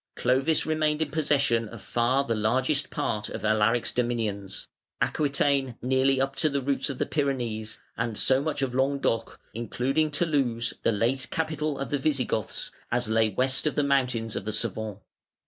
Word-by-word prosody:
Clovis 135 +5 +2
remained 155 -1 +1
in 145 - -7
possession 140 -7 +2
of 115 - -9
far 120 +7 +1
the 120 - -1
largest 130 +7 +1
part 105 0 -2
of - - -5
Alaric's 110 +2 +2
dominions, 110 -5 -2 0.3
Aquitaine 140 -3 +1
nearly 130 +1 +2
up 135 +1 0
to 155 - +2
the 140 -1 0
roots 140 +1 0
of 135 - -4
the - - 0
Pyrenees, 120 -7 -1 0.2
and 115 -2 -2
so 130 0 +3
much 145 -2 -1
of 130 -2 -1
Languedoc 135 -3 0
(including 130 +7 0
Toulouse, 140 -7 0
the - - +2
late 120 +5 +1
capital 155 -2 -1
of 135 - -4
the 145 - +1
Visigoths) 130 -7 -1 0.2
as 120 -1 0
lay 110 0 +3
west 130 +7 +1
of 150 - -1
the 145 - +2
mountains 125 -5 +1
of - - -3
the 110 +1 -3
Cevennes. 110 -1 -3
130 Hz, 165 wpm, -27 LUFS, 115-140 Hz, 0.3 s, so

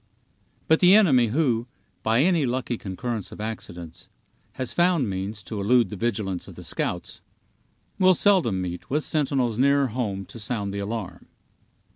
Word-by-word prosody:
But 160 - +4
the 180 +2 +7
enemy 135 - +5
who, 120 -2 0 0.3
by 110 +3 +2
any 170 -3 +3
lucky 125 -1 -1
concurrence 110 +2 -5
of - - -11
accidents, 90 -5 -7 0.4
has 130 -2 -3
found 175 -7 +2
means 95 +2 -4
to 100 +3 -5
elude 115 0 +3
the - - -4
vigilance 100 -4 -2
of - - -11
the - - -9
scouts, - - -3 0.8
will 185 -1 +5
seldom 170 - +3
meet 90 -1 -6
with 150 +3 0
sentinels 135 -6 0
nearer 140 0 +3
home 105 -5 -3
to 115 - -11
sound 105 -3 -3
the 100 - -3
alarm. 100 -1 -5
115 Hz, 155 wpm, -25 LUFS, 100-140 Hz, 0.8 s, the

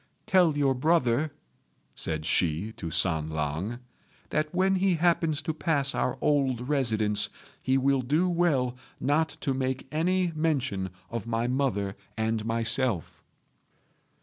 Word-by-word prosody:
"Tell 175 -6 +4
your 140 -2 +3
brother," 150 0 +2 0.6
said 80 -1 -3
she 90 +3 +1
to 85 -6 -6
San 80 -2 +2
lang, 80 +9 -2 0.5
"that 155 0 0
when 190 +1 +2
he 190 -1 +2
happens 165 -2 +1
to 160 - -2
pass 145 -4 +1
our 130 - -1
old 135 -4 +1
residence 110 -7 +1 0.3
he 130 +1 +2
will 135 0 +2
do 150 +8 +1
well 160 -8 +1 0.2
not 155 +4 +2
to 135 - 0
make 130 0 -2
any 175 +3 +1
mention 135 -12 0 0.2
of 115 -2 -4
my 115 0 0
mother 120 -7 0 0.2
and 110 0 0
myself." 115 -3 -1
130 Hz, 130 wpm, -28 LUFS, 110-155 Hz, 0.6 s, Tell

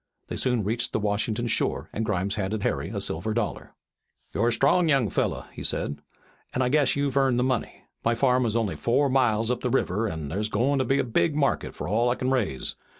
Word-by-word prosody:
They - - -3
soon 125 -4 +1
reached 115 +4 -1
the - - +1
Washington 105 +2 -1
shore, 115 - -1
and 110 - -2
Grimes 100 -2 -1
handed 105 0 -2
Harry - - -1
a - - -3
silver 110 +7 -2
dollar. 120 - -3 0.6
"You're 105 +8 +1
a - - +3
strong 150 +8 +3
young 135 - +2
fellow," - - -1
he - - -7
said, 70 0 -1 0.5
"an' 130 - +2
I 125 - +1
guess 145 0 +3
you've 140 -2 -1
earned 135 -3 +3
the 125 - +2
money. 130 -2 -2 0.2
My 115 +1 +2
farm 125 0 +2
is 110 - -1
only 115 -5 0
four 140 +4 +2
miles 120 -3 +2
up 125 - -2
the 125 - -1
river 115 -3 0
an' 80 -4 -5
thar's 105 +8 -2
goin' 130 +6 +1
to 130 - +1
be 135 +3 +2
a 140 - +2
big 135 +6 +1
market 140 -2 0
for - - -5
all 115 +5 +2
I 120 - +1
kin 130 +1 -1
raise. 110 - -1
120 Hz, 225 wpm, -26 LUFS, 105-130 Hz, 0.6 s, a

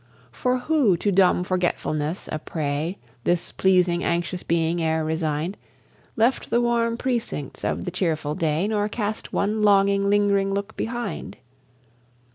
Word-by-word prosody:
For 250 0 0
who 250 - +2
to 205 +4 0
dumb 185 -1 +4
forgetfulness 175 -3 -1
a 155 - -2
prey, 155 +3 -3 0.3
This 175 -1 0
pleasing 180 -2 +2
anxious 175 +1 -1
being 165 +1 0
e'er 160 -1 0
resigned, 160 +2 -2 0.6
Left 235 +4 +1
the 235 - +3
warm 235 -1 +1
precincts 235 - -3
of - - -1
the 180 - -3
cheerful 160 -5 -1
day, 160 +4 0
Nor 210 -1 0
cast 215 -1 -3
one 215 +2 0
longing, 200 -1 +4
ling'ring 200 -1 +2
look 200 +2 -4
behind? 240 +1 -4
190 Hz, 135 wpm, -24 LUFS, 165-210 Hz, 0.6 s, dumb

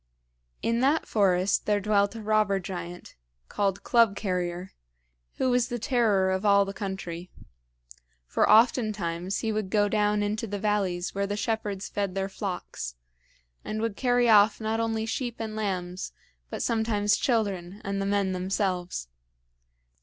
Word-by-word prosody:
In 230 0 +1
that 280 +5 +2
forest 190 -2 +2
there 210 -1 +3
dwelt 200 +1 +1
a 225 - -7
robber 210 -2 +2
giant, 175 -2 -7 0.4
called 200 -1 -1
Club 230 -4 +4
carrier, 180 -2 -3 0.6
who 260 - +1
was 245 -1 +2
the 240 - -3
terror 215 -6 +2
of 190 +1 -1
all 200 -1 +5
the 195 - -5
country. 185 -3 -5 1.0
For - - +1
oftentimes 205 -6 +2
he 220 - -1
would 215 -3 -2
go 205 +1 +3
down 210 0 +1
into 215 +2 -2
the 205 0 -3
valleys 195 -4 -1
where 200 0 -1
the 205 +1 -3
shepherds 205 -2 -2
fed 200 -2 -3
their 195 0 -1
flocks, 180 - -5 0.7
and 215 - -4
would 225 -2 -1
carry 245 0 +2
off 210 -1 +6
not 220 0 -1
only 225 -1 -1
sheep 240 +1 -3
and 220 -1 -5
lambs, 185 -4 -3 0.4
but - - -3
sometimes 220 -3 +1
children 200 -6 -1
and 195 0 -2
the 195 - -1
men 200 -1 +1
themselves. 185 - -2
205 Hz, 150 wpm, -27 LUFS, 190-220 Hz, 1.0 s, off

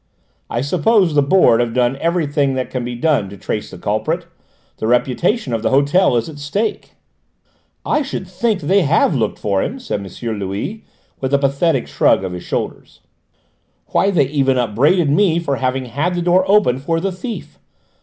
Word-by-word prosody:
I 120 - -2
suppose 180 - +2
the 145 - +4
Board 140 -5 +4
have 120 -1 -1
done 125 +1 +2
everything 145 -4 0
that 130 -1 -3
can 125 -2 -3
be 120 0 -4
done 140 -7 +1
to 100 - -10
trace 105 +2 -4
the 95 - -10
culprit? 110 - -2 0.5
The 110 - -3
reputation 125 - +1
of 115 - -1
the - - +1
hotel 140 +2 +3
is 115 - -1
at 150 -3 -9
stake." 200 +10 -3 0.9
"I 300 - +1
should 260 -9 -5
think 200 +2 -1
they 190 +7 +3
have 165 +2 +2
looked 115 -6 -1
for 100 -2 0
him!" 255 - -3
said 105 - -4
M. 110 +3 -5
Louis, 100 - -4 0.4
with 135 +1 0
a - - +5
pathetic 140 0 +1
shrug - - +2
of 95 - -4
his 90 0 -6
shoulders. - - -5 0.9
"Why, 195 - +2
they 165 -8 +3
even 135 -3 +1
upbraided 140 - +2
me 170 +1 +3
for 145 -5 -1
having 130 0 -1
had 145 +9 -2
the 175 - -1
door 180 +2 +3
opened 190 -11 +3
for 165 +3 -1
the 195 +3 -2
thief! 225 +6 -7
145 Hz, 185 wpm, -18 LUFS, 120-180 Hz, 0.9 s, a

